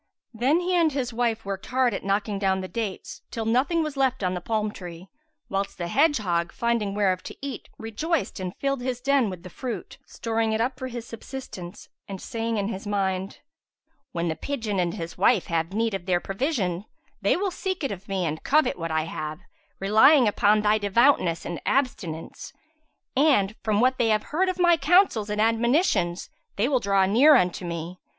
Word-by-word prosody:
Then 265 +9 +2
he 360 +1 -1
and 335 -3 +3
his 255 -4 -2
wife 230 -2 -1
worked 195 -1 -5
hard 255 -2 +2
at - - -4
knocking 200 +1 -1
down 190 -1 +1
the 185 - -5
dates, 215 -2 -5
till 225 -1 -4
nothing 270 +9 +2
was 305 -2 -4
left 260 -4 +1
on 180 0 +1
the 180 - -4
palm 215 +2 -1
tree, 180 -1 -10 0.4
whilst 195 0 -3
the 175 -2 -3
hedgehog, 205 - +2
finding 230 -4 -1
whereof 190 -3 +1
to - - -9
eat, 275 -1 -6
rejoiced 265 - -2
and 185 0 -5
filled 275 -2 -1
his 250 -1 -2
den 275 -3 +2
with 180 -2 -8
the 185 - -9
fruit, 250 +4 -6
storing 225 -1 -1
it 220 - 0
up 255 +3 -1
for 260 - -4
his 240 -2 -6
subsistence 220 -6 -8 0.2
and 195 -1 -6
saying 230 0 -3
in 200 -1 -1
his 200 -2 -6
mind, 195 -1 -2 0.7
"When 170 0 -2
the 160 - -1
pigeon 220 - -3
and 175 -1 0
his 165 0 -7
wife 225 -8 +4
have 165 +1 0
need 225 +2 0
of 190 -2 -5
their 180 -1 +2
provision, 195 - -2 0.4
they 200 - +2
will 390 0 -1
seek 370 -1 -3
it 275 - -1
of 195 0 -8
me 190 -2 -1
and 155 0 -3
covet 305 -7 +2
what 165 0 -3
I 160 0 0
have, 155 -1 -5 0.4
relying 220 +7 +6
upon 210 +1 +3
thy 210 +1 +3
devoutness 205 -4 +2
and 175 - -5
abstinence; 185 - -2 0.6
and, 255 -8 +3
from 210 -2 +1
what 255 +2 +2
they 235 - +3
have 215 -1 +2
heard 370 +4 +2
of 370 - -2
my 345 -2 +5
counsels 300 - +3
and 210 0 -2
admonitions, 225 - +1 0.2
they 210 +4 +1
will 265 -2 +2
draw 195 -3 +2
near 255 +10 +6
unto 180 0 +1
me. 170 +1 -5
215 Hz, 195 wpm, -25 LUFS, 190-260 Hz, 0.7 s, relying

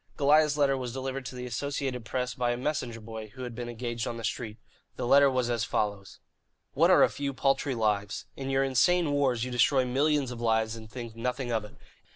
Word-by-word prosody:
Goliah's 150 +1 +4
letter 140 -2 +3
was 125 -3 -4
delivered 135 0 -4
to - - -8
the 125 0 -5
Associated 125 0 -3
Press 125 +1 -2
by 120 -1 -1
a - - -4
messenger 130 -3 -2
boy 110 0 -8
who 130 - -7
had 120 -1 -5
been 120 +1 -5
engaged 120 0 -4
on 115 - -4
the 115 - -7
street. 110 -2 -3 0.4
The - - -3
letter 140 +3 +6
was 130 -2 0
as 115 -2 0
follows: 100 -3 -2 0.6
"What - - +4
are - - +7
a - - +6
few 140 -1 -4
paltry 135 0 +1
lives? 105 -2 -1
In 135 0 -5
your 135 0 +2
insane 145 +5 +3
wars 135 -5 +1
you 125 - -4
destroy 130 +2 +3
millions 140 +1 +1
of 120 -1 -7
lives 110 -1 +1
and 110 -1 -10
think 115 -2 -7
nothing 125 +2 -3
of 110 -2 0
it. 105 - -14
125 Hz, 215 wpm, -28 LUFS, 115-135 Hz, 0.6 s, are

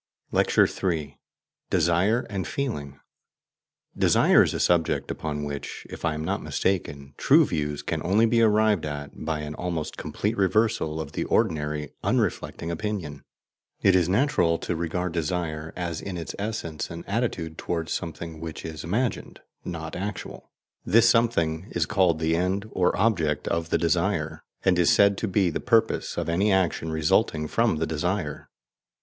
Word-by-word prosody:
LECTURE - - +4 0.3
III. 75 -3 -5 0.5
DESIRE 90 +8 +2
AND 95 -3 -3
FEELING 75 - -4 1.0
Desire - - +5
is - - +1
a - - -2
subject 85 -2 +1
upon 75 -2 -4
which, 70 -1 -6
if - - -8
I 80 -2 +1
am 75 +1 -4
not - - -1
mistaken, 70 -7 -2
true - - +5
views 75 -2 -2
can - - -2
only 105 +6 +4
be 115 0 +3
arrived 110 -3 +3
at 70 -1 -5
by 80 -2 -3
an 75 0 -5
almost 85 -2 -4
complete 105 +3 -2
reversal 100 -5 +1
of 75 -2 -5
the - - -2
ordinary 75 -8 0
unreflecting 85 - -1
opinion. 85 -7 -4 0.6
It 95 - +5
is 90 -2 +3
natural 95 - +2
to 90 - -3
regard 85 +2 -2
desire 80 -1 -2
as 85 -3 -3
in 95 -3 -5
its 85 - -5
essence 100 -7 -4
an 85 +1 -7
attitude 100 -8 -2
towards 85 -2 -2
something 80 -1 -5
which 80 -1 -7
is 80 -2 -6
imagined, 115 +8 -2 0.2
not 85 -2 -5
actual; 100 +1 -6 0.3
this 115 +5 +5
something 100 -8 +2
is 85 -2 +2
called 90 -3 +2
the 80 +1 +1
END 95 +4 0
or 90 -1 +2
OBJECT 80 -10 +1
of 85 -1 -1
the - - +2
desire, 85 -2 0 0.2
and 90 -2 +4
is 85 - +4
said 100 0 +5
to 110 - -1
be 95 -2 +2
the - - -2
PURPOSE - - +1
of - - -1
any 95 +5 +2
action 90 -4 +1
resulting 75 0 +1
from 115 +3 +2
the 75 - -1
desire. 80 -1 -2
85 Hz, 160 wpm, -26 LUFS, 80-100 Hz, 1.0 s, Desire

